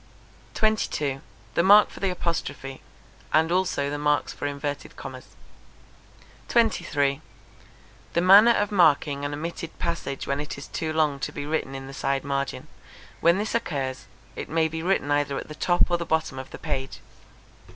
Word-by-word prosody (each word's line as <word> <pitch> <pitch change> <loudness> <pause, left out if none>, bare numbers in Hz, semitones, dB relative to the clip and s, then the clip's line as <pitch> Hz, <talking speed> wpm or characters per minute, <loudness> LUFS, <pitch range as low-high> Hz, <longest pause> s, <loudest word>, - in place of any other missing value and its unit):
22. 150 -11 0 0.3
The - - +3
mark 205 +3 +7
for - - -11
the 195 - 0
apostrophe; 165 -6 -3 0.5
and 160 +2 +3
also 180 -6 +1
the 145 - -3
marks 150 0 +1
for 145 - -4
inverted 145 0 -5
commas. - - -10 1.1
23. 160 - +1 0.9
The 170 - +2
manner 200 +5 +8
of 205 -2 0
marking 150 -6 +3
an 145 - -2
omitted 165 +2 -5
passage 170 -5 -3
when 140 +1 -1
it 145 -1 -5
is 140 - -8
too 160 -1 -3
long 155 -3 +1
to - - -3
be 145 - -5
written 150 -3 -2
in 135 0 -6
the 135 - -9
side 135 0 -1
margin. 140 -1 -2 0.5
When 170 +2 +4
this 210 +2 -2
occurs, 135 - -2 0.3
it - - -6
may 160 0 +2
be 160 0 -5
written 170 -5 0
either 145 -1 +1
at - - -6
the - - -6
top 175 +3 +2
or 175 - +3
the - - -2
bottom 160 -5 0
of 130 - -8
the - - -8
page. 135 0 -4
150 Hz, 170 wpm, -25 LUFS, 140-175 Hz, 1.1 s, manner